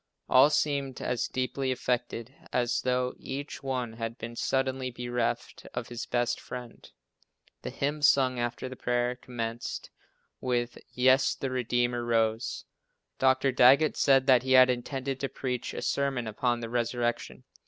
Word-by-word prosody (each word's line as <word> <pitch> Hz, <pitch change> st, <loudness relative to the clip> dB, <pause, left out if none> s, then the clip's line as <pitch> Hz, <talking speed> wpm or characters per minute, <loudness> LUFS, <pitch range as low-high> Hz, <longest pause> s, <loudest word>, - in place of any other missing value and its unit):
All 130 Hz, +3 st, +6 dB
seemed 140 Hz, -3 st, 0 dB
as 125 Hz, -2 st, -1 dB
deeply 130 Hz, +1 st, -2 dB
affected 125 Hz, -1 st, -2 dB, 0.2 s
as 125 Hz, 0 st, +1 dB
though 125 Hz, 0 st, 0 dB
each 140 Hz, +2 st, -6 dB
one 125 Hz, -4 st, -3 dB
had 115 Hz, 0 st, -5 dB
been 120 Hz, -1 st, -7 dB
suddenly 130 Hz, 0 st, -1 dB
bereft 120 Hz, -1 st, -3 dB
of -, -, -4 dB
his 120 Hz, -1 st, -6 dB
best 120 Hz, -1 st, 0 dB
friend. 125 Hz, -2 st, -9 dB, 0.7 s
The -, -, -5 dB
hymn 145 Hz, +2 st, -2 dB
sung 130 Hz, -3 st, +4 dB
after 120 Hz, +1 st, -3 dB
the 130 Hz, -, -7 dB
prayer, 120 Hz, 0 st, 0 dB
commenced 120 Hz, -2 st, -5 dB, 0.5 s
with 120 Hz, -1 st, -1 dB
"Yes, 130 Hz, +1 st, +4 dB
the 135 Hz, -, -4 dB
Redeemer 120 Hz, -1 st, 0 dB
rose." 115 Hz, -1 st, 0 dB, 0.5 s
Dr. 130 Hz, 0 st, +3 dB
Daggett 130 Hz, +5 st, +5 dB
said 135 Hz, -2 st, +4 dB
that 130 Hz, -3 st, +6 dB
he 130 Hz, +1 st, 0 dB
had 130 Hz, 0 st, +8 dB
intended 135 Hz, +2 st, -3 dB
to 135 Hz, -, -2 dB
preach 125 Hz, -2 st, -3 dB
a -, -, -5 dB
sermon 135 Hz, -3 st, 0 dB
upon 120 Hz, +2 st, -1 dB
the 115 Hz, -, -5 dB
resurrection. 120 Hz, 0 st, -2 dB
125 Hz, 145 wpm, -29 LUFS, 120-130 Hz, 0.7 s, had